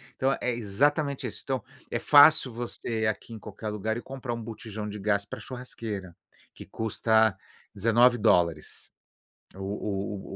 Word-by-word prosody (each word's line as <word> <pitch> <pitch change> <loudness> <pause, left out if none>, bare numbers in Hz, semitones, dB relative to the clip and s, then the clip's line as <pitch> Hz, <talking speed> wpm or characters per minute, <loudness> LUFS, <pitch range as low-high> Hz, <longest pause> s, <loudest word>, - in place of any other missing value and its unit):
então, 135 +1 +1
é 125 - 0
exatamente 140 +6 0
isso. - - -7
Então, 130 -5 -2 0.3
é - - -1
fácil 145 -4 +6
você, 115 -1 -3
aqui 110 +2 -3
em 110 - -8
qualquer 105 +1 -7
lugar 105 +1 -2
e 120 - -5
comprar 130 -2 -6
um 115 - -5
botijão 110 -1 -6
de 105 0 -7
gás 100 0 +1
pra - - -8
a - - -11
churrasqueira, 110 -8 -6 0.4
que - - -11
custa 110 -1 +2 0.4
$19 110 -7 +2 0.7
o 100 0 -4
110 Hz, 145 wpm, -27 LUFS, 100-125 Hz, 0.7 s, fácil